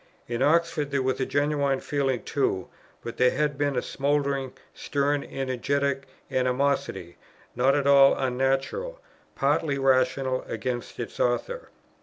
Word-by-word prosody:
In 120 +1 -3
Oxford 155 0 +2
there 140 -2 0
was 130 0 0
genuine 140 0 +1
feeling 135 -4 -1
too; 95 -10 -1 0.3
but 115 - -7
there 125 0 +5
had 150 +1 0
been 145 0 0
a 125 - 0
smouldering, 140 -2 -1 0.2
stern, 145 0 -1
energetic 135 +1 -2 0.2
animosity, 125 -9 -1 0.4
not 135 +2 +3
at 145 -1 0
all 140 -1 +7
unnatural, 135 - -1 0.4
partly 145 +1 +1
rational, 130 -1 +2
against 125 -2 -4
its - - -6
author. - - -1
140 Hz, 125 wpm, -26 LUFS, 130-145 Hz, 0.4 s, all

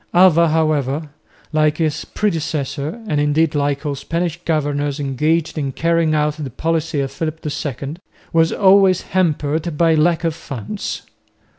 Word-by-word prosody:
Alva 170 -2 +6
however, 155 -2 0 0.4
like 155 0 +2
his 155 -2 -1
predecessor 160 - -2
and 150 -8 0
indeed 150 +2 +2
like 145 0 -1
all 145 - -1
Spanish 165 +4 -3
governors 145 -2 -1
engaged 155 +4 0
in 140 -2 -2
carrying 165 +1 +1
out 150 0 +1
the 135 - -4
policy 160 +2 -1
of 135 -1 -3
Philip 155 +2 -4
II, 145 0 -4 0.4
was 165 0 +4
always 195 -2 +5
hampered 160 -2 -1
by 165 0 +4
lack 165 +2 +2
of 165 -1 +1
funds. 155 - -6
155 Hz, 140 wpm, -19 LUFS, 145-165 Hz, 0.4 s, Alva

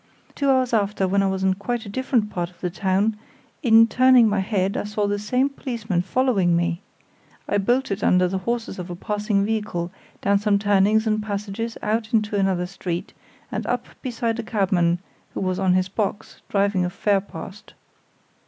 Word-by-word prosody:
Two 280 -1 0
hours 260 -2 +2
after, 205 -3 +1
when 200 +2 +2
I 195 - +2
was 190 0 -2
in 190 0 +3
quite 225 +4 -3
a - - -8
different 230 -1 0
part 175 -2 -2
of 180 - -24
the 180 - -3
town, 195 +4 0 0.4
in 225 -5 +7
turning 250 0 +5
my 205 -1 +1
head 195 -1 0
I - - -2
saw 210 0 -1
the 205 0 -1
same 250 +6 +1
policeman 230 -9 -3
following 195 -4 +2
me. 170 +1 0 0.7
I 205 - +1
bolted 225 -1 0
under 180 0 +4
the 190 +1 -2
horses 230 -1 -3
of 180 0 -6
a 175 - -5
passing 205 +1 -1
vehicle, 210 -6 -2 0.3
down 200 0 +2
some 205 0 +2
turnings 205 +2 +3
and 215 -1 +1
passages, 210 +2 -4
out 220 +1 0
into 215 -1 +1
another 190 -3 +1
street, 180 -1 -5 0.4
and - - -2
up - - -2
beside 235 -3 -2
a - - -2
cabman 185 -6 +1 0.4
who - - -2
was 185 -1 -1
on 190 -2 +3
his 185 0 +2
box, 205 +1 -4
driving 200 -2 +1
a 180 - 0
fare 195 +1 +1
past. 195 +2 -10
205 Hz, 185 wpm, -23 LUFS, 190-225 Hz, 0.7 s, in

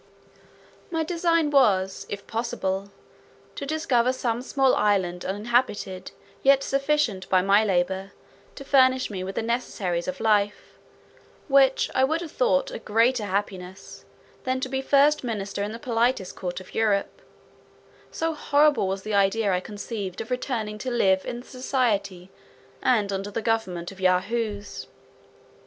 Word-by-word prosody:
My 325 -1 -1
design 335 -2 +1
was, 195 -9 +2
if 200 0 -6
possible, 200 -4 -3 0.6
to 280 - -6
discover 270 -6 +1
some 240 -2 -2
small 265 0 +2
island 185 -4 +1
uninhabited, 205 -2 -1 0.3
yet 275 0 +5
sufficient, 275 -9 0
by 185 -1 +4
my 200 +2 +4
labour, 190 0 0 0.4
to 275 - -9
furnish 260 -3 +3
me 185 -2 -4
with 190 +1 -6
the - - -1
necessaries 200 -7 -2
of 275 0 -4
life, 205 -2 +1 0.7
which 270 -2 +4
I 260 - +3
would 315 +5 +1
have 330 -3 -7
thought - - +1
a - - -6
greater 230 +1 +2
happiness, 190 -1 -5 0.4
than 260 0 -1
to 260 - -2
be 265 0 -1
first 285 +2 +3
minister 205 -4 -3
in 205 +1 -2
the 230 - -6
politest 235 -4 0
court 180 -1 -4
of 185 - -14
Europe; 210 -3 0 0.9
so 325 0 -2
horrible 295 -6 +3
was 190 0 -3
the 215 - -4
idea 200 +1 +2
I 180 - +1
conceived 205 -1 -6
of 225 +3 -6
returning 225 -4 -3
to 255 - -3
live 190 -6 +2
in 240 0 -4
the - - -17
society, 205 -8 -1 0.5
and 210 -5 +2
under 195 +1 -3
the 220 +2 -4
government 195 -6 -1
of 190 -1 -13
Yahoos. 205 +3 -1
225 Hz, 145 wpm, -25 LUFS, 195-265 Hz, 0.9 s, yet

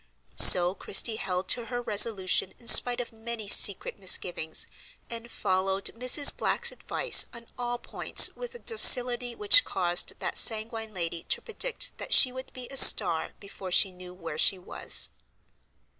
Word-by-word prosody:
So 180 0 +7
Christie 215 +3 -1
held 185 -1 -6
to 240 - 0
her 245 +1 -7
resolution 205 -5 -1
in 235 - -24
spite 245 +1 +5
of 240 -1 -8
many 225 -1 -8
secret 200 0 +2
misgivings, 175 -4 -1 0.5
and 230 0 -10
followed 190 -1 -4
Mrs. 250 +4 +2
Black's - - -3
advice - - +1
on 235 0 -13
all 245 -1 -6
points 240 - +1
with 485 -1 -11
a - - -9
docility 245 - +2
which 420 +4 +4
caused 175 -2 -2
that - - -3
sanguine 220 -1 -1
lady 170 -1 -6
to - - -3
predict - - -6
that - - -6
she 255 - +4
would 260 +1 -12
be 250 -1 -11
a 275 - -6
star 175 -10 +4
before 195 -2 -12
she 190 +2 +2
knew 180 0 -14
where 165 -4 -10
she 195 - +1
was. 180 - -4
220 Hz, 160 wpm, -25 LUFS, 185-245 Hz, 0.5 s, So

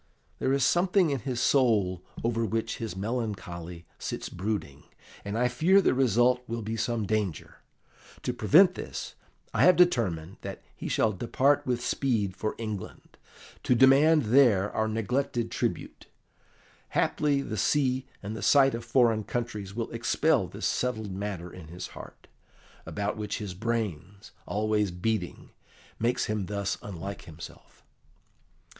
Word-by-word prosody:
There 130 - +1
is 135 -2 +3
something 180 0 +3
in 140 - -1
his 125 0 -3
soul 105 -10 +2 0.2
over 115 0 0
which 115 +1 -2
his 115 -6 -5
melancholy 95 -6 -4
sits - - -4
brooding, 95 -6 -4 0.4
and 100 +2 -3
I 125 +1 +3
fear 160 +11 +4
the 195 - +3
result 125 -1 +3
will 115 0 -4
be 110 +2 -3
some 115 -1 -1
danger. 100 -5 -2 0.7
To 125 - -1
prevent 160 - +5
this, - - -6 0.4
I - - +1
have 180 - +7
determined 100 - +2
that 100 0 -7
he - - -6
shall 110 - +2
depart 135 +8 +1
with 120 -1 -1
speed 110 -8 0
for 110 - -3
England, 110 -4 -7 0.5
to 125 - +2
demand 140 +5 +6
there 110 -4 +4
our 110 0 0
neglected 115 +2 -1
tribute. - - -3 0.9
Haply 145 -2 +1
the 110 - -4
sea 130 +4 +1 0.2
and 105 +2 -5
the 110 - -6
sight 135 +5 +5
of 115 0 -4
foreign 115 -2 +3
countries 105 -4 -4
will 115 -1 -3
expel - - +1
this - - -6
settled 110 -5 -1
matter 95 -3 -5
in 85 -4 -10
his 90 +3 -7
heart, - - -12 0.6
about 100 +1 -3
which 105 -1 -3
his 105 -5 -5
brains, 105 -3 -4 0.2
always 105 -1 +1
beating, 90 +1 -3 0.5
makes 120 +2 +1
him 105 -3 -2
thus 100 -1 -2
unlike 100 0 -7
himself." 80 0 -12
110 Hz, 145 wpm, -28 LUFS, 100-125 Hz, 0.9 s, have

